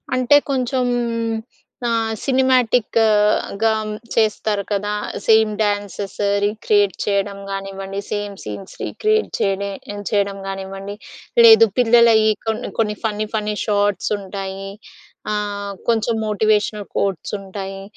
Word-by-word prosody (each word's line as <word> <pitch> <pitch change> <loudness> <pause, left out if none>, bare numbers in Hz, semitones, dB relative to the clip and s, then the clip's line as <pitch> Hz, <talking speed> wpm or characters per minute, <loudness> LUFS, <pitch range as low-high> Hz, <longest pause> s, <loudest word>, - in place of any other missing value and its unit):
అంటే 255 +3 +5
కొంచెం 255 -1 0 1.0
ఆహ్, 225 -1 0
సినిమాటిక్‌గా 225 -5 +2 0.4
చేస్తారు 215 -2 +1
కదా! 205 +1 -1 0.3
సేమ్ 220 -1 +5
డ్యాన్సెస్ 205 -1 -2 0.3
రీక్రియేట్ 205 -2 +2
చేయడం 200 0 -1
గానివ్వండి 195 0 -5
సేమ్ 205 -1 -3
సీన్స్ 105 - -8
రీక్రియేట్ 435 0 0
చేయిడే 200 0 0 0.4
చేయడం 200 -1 0
గానివ్వండి. 195 +1 -6 0.5
లేదు 225 0 +9
పిల్లలయి 230 -2 +5 0.2
కొన్ని 220 -1 -2
కొన్ని 210 -2 +1
ఫన్నీ 215 -1 -1
ఫన్నీ 210 -1 -1
షార్ట్స్ 205 -2 +1
ఉంటాయి, 195 0 -6 0.6
ఆహ్, 205 -1 -3 0.2
కొంచెం 225 0 +1
మోటివేషనల్ 210 -1 +1
కోట్స్ 195 -3 -1
ఉంటాయి. 195 0 -7
210 Hz, 100 wpm, -20 LUFS, 200-225 Hz, 1.0 s, లేదు